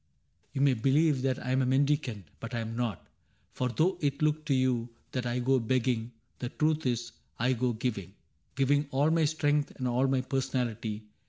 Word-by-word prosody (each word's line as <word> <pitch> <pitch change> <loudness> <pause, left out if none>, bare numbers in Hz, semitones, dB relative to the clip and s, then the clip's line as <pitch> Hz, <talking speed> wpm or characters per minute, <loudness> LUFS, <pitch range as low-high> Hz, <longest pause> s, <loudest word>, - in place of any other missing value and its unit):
You 135 - -1
may 140 -1 +5
believe 135 +4 +3
That 130 -1 +1
I 130 - -1
'm 130 +1 +3
a - - +2
mendicant, 135 -5 +1 0.2
but 115 +2 -6
I - - -1
am 115 0 -5
not: 115 -6 -2 0.5
For 125 - -1
though 165 - +1
it 140 -2 0
look 155 0 +1
to 145 - +1
you 125 -2 +1 0.2
that 125 -1 -2
I 120 +1 -1
go 130 +1 +3
begging. 120 -1 0 0.3
The 125 - -3
truth 155 0 0
is 120 -1 -1 0.3
I 125 +3 +2
go 125 0 0
giving 105 -5 -3 0.2
— 80 - -42
giving 145 +2 +2
all 145 +4 +2
My 165 -1 +3
strength 145 -1 +1
and 130 -3 -1
all 125 +2 +2
my 135 -1 +2
personality. 125 -5 -2
130 Hz, 195 wpm, -30 LUFS, 120-140 Hz, 0.5 s, may